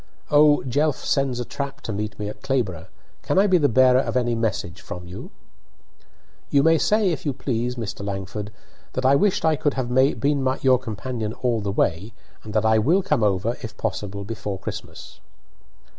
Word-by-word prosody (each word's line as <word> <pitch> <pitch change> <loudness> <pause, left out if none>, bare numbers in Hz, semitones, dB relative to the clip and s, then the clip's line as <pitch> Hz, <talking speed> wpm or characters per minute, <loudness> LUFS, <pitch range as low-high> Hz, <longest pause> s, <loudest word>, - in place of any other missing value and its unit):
'Oh, 150 0 +5
Jelf 145 +3 0
sends 135 -3 0
a 120 - -3
trap 140 +3 -5
to 110 - -4
meet 105 +1 -4
me 105 - -4
at 105 - -8
Clayborbough! 110 -12 -2 0.3
Can - - -1
I 195 - +6
be 185 -3 +4
the 145 -2 +3
bearer 130 +1 +5
of 130 - -1
any 120 -1 +1
message 110 -5 -2
from 90 0 -8
you?" 90 - -8 1.2
"You 140 -1 +3
may 165 0 +4
say, 210 -3 +2
if 165 - -4
you 145 - -1
please, 125 -2 -2
Mr. 110 -4 -5
Langford, 100 +1 -5 0.4
that 130 - -2
I 135 - +6
wished 190 +3 +2
I 160 -1 +4
could 145 -1 -1
have 125 -2 -2
been 130 +1 +2
your 130 -2 +5
companion 115 -1 -4
all 120 -3 -1
the 100 -1 -2
way, 100 +3 -1 0.3
and 110 - -8
that 110 0 +2
I 110 0 +4
will 170 - +3
come 150 -9 +1
over, 105 +3 +1
if 110 -3 -8
possible, 100 -2 -3
before 105 -2 -5
Christmas." 95 - -8
120 Hz, 190 wpm, -23 LUFS, 105-140 Hz, 1.2 s, I